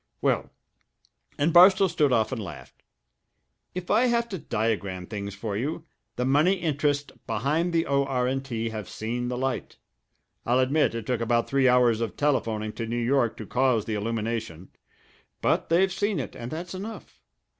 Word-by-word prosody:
Well" -, -, 0 dB, 0.9 s
and 155 Hz, +3 st, +1 dB
Barstow 190 Hz, +2 st, +7 dB
stood 155 Hz, -5 st, +1 dB
off 115 Hz, -1 st, +2 dB
and 125 Hz, -4 st, -3 dB
laughed 95 Hz, -, -10 dB, 0.9 s
"if 180 Hz, -1 st, -4 dB
I 225 Hz, +4 st, +4 dB
have 235 Hz, -1 st, +1 dB
to 190 Hz, -4 st, -4 dB
diagram 100 Hz, -7 st, -2 dB
things 100 Hz, 0 st, -6 dB
for 105 Hz, 0 st, -4 dB
you, 150 Hz, +9 st, -3 dB, 0.3 s
the 125 Hz, -, -1 dB
money 145 Hz, +8 st, +4 dB
interests 145 Hz, -5 st, -1 dB, 0.2 s
behind 155 Hz, +10 st, 0 dB
the 165 Hz, 0 st, +1 dB
O.R. 135 Hz, -2 st, +1 dB
& -, -, -1 dB
T. 115 Hz, -4 st, -3 dB
have 110 Hz, -3 st, -6 dB
seen 120 Hz, +3 st, -3 dB
the 125 Hz, 0 st, -3 dB
light. 130 Hz, 0 st, -3 dB, 0.7 s
I'll 120 Hz, +1 st, +2 dB
admit 130 Hz, 0 st, +2 dB
it 115 Hz, -2 st, -4 dB
took 125 Hz, -1 st, -1 dB
about 115 Hz, 0 st, +1 dB
three 135 Hz, -1 st, +3 dB
hours 120 Hz, -2 st, +4 dB
of 115 Hz, -, -3 dB
telephoning 110 Hz, -7 st, 0 dB
to 115 Hz, -, -4 dB
New 120 Hz, +1 st, -2 dB
York 120 Hz, 0 st, +1 dB
to 110 Hz, -, -7 dB
cause 125 Hz, -2 st, +1 dB
the 110 Hz, -, -3 dB
illumination; 110 Hz, -4 st, -3 dB, 0.7 s
but -, -, +1 dB
they've 180 Hz, +3 st, +3 dB
seen 205 Hz, -2 st, 0 dB
it, 130 Hz, -, -5 dB
and 120 Hz, 0 st, -6 dB
that's 170 Hz, +5 st, -6 dB
enough. 205 Hz, +4 st, -8 dB
125 Hz, 170 wpm, -26 LUFS, 115-155 Hz, 0.9 s, Barstow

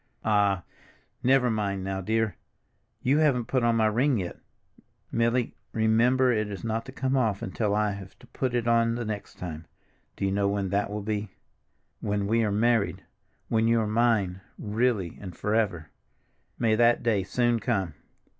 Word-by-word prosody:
"Ah, 100 Hz, -4 st, +2 dB, 0.6 s
never 130 Hz, -1 st, +3 dB
mind 100 Hz, -3 st, -1 dB
now, 95 Hz, 0 st, -3 dB
dear! 110 Hz, -1 st, 0 dB, 0.7 s
You 140 Hz, +4 st, +3 dB
haven't 135 Hz, -6 st, +2 dB
put 130 Hz, +1 st, 0 dB
on 120 Hz, 0 st, +3 dB
my 110 Hz, -1 st, +3 dB
ring 120 Hz, +5 st, +2 dB
yet, 90 Hz, -4 st, -4 dB, 0.7 s
Milly—remember 115 Hz, +1 st, +2 dB
it 105 Hz, -3 st, 0 dB
is 100 Hz, -, -7 dB
not 115 Hz, 0 st, -2 dB
to -, -, -7 dB
come 130 Hz, 0 st, -1 dB
off 110 Hz, -6 st, +1 dB
until 105 Hz, +2 st, -1 dB
I 105 Hz, -1 st, +1 dB
have 100 Hz, -1 st, -9 dB
to -, -, -17 dB
put 125 Hz, 0 st, -2 dB
it 120 Hz, -1 st, 0 dB
on 115 Hz, 0 st, +3 dB
the 120 Hz, -1 st, -3 dB
next 105 Hz, -2 st, -5 dB
time—do 80 Hz, +3 st, -8 dB
you 95 Hz, -, +1 dB
know 100 Hz, 0 st, +1 dB
when 100 Hz, -1 st, -1 dB
that 100 Hz, +2 st, 0 dB
will 105 Hz, 0 st, -4 dB
be? 105 Hz, 0 st, -2 dB, 0.7 s
When 100 Hz, -1 st, -1 dB
we 115 Hz, +3 st, +2 dB
are 105 Hz, -, 0 dB
married, 115 Hz, +1 st, +1 dB, 0.4 s
when 110 Hz, 0 st, +2 dB
you 115 Hz, 0 st, +4 dB
are 110 Hz, -, 0 dB
mine, 105 Hz, -4 st, +1 dB, 0.2 s
really 105 Hz, -4 st, -1 dB
and 90 Hz, -4 st, -8 dB
forever. 100 Hz, -8 st, -1 dB, 0.7 s
May 115 Hz, -2 st, +2 dB
that 120 Hz, +2 st, +4 dB
day 110 Hz, -4 st, +2 dB
soon 120 Hz, +4 st, +1 dB
come! 95 Hz, -7 st, -1 dB
110 Hz, 165 wpm, -27 LUFS, 100-120 Hz, 0.7 s, you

